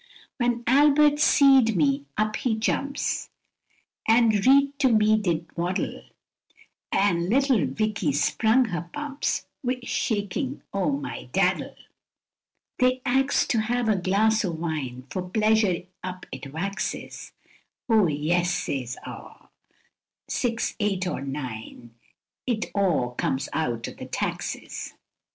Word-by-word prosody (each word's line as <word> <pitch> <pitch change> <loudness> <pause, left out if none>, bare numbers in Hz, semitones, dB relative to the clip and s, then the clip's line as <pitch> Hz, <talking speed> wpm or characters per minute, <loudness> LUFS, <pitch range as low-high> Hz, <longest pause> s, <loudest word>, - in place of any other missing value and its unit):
When 240 -2 0
Albert 295 +3 +5
seed 270 -6 +5
me, 140 -2 +1
up 215 0 0
he 240 -4 0
jumps, 275 +6 -1 0.8
an' 230 +1 +5 0.2
reet 280 +1 +4
to 270 -3 +4
me 215 -1 +4
did 175 -6 0
waddle; 175 +2 -2 0.9
An' 175 -3 +2
little 255 - +3
Vicky 200 +2 -1
sprung 220 - +2
her 175 -1 -4
pumps 295 -1 -3 0.2
wi' 250 0 -1
shakin' 230 +5 -2
o' 195 +6 +1
mydaddle; 285 +1 -1 1.0
They 255 0 +2
ax'd 270 +2 +2
to 230 - +2
have 240 +1 -1
a 215 - +3
glass 210 +4 +2
o' 185 - -1
wine, 155 -7 -4
for 185 - -2
pleasure 215 -4 +2 0.2
up 185 0 -6
it 135 - -8
waxes; 195 +7 -4 0.5
O 220 -5 +4
yes, 170 +4 +1
says 125 -7 -3
aw, - - -11 0.8
six 230 -2 -1
eight 195 -3 0
or 180 - -3
nine, 125 -4 -7 0.5
it 230 -4 -1
o' 180 -11 +1
comes 130 +2 -2
eaut 120 -7 -1
o'th - - -9
taxes. - - -4
215 Hz, 120 wpm, -25 LUFS, 170-245 Hz, 1.0 s, Albert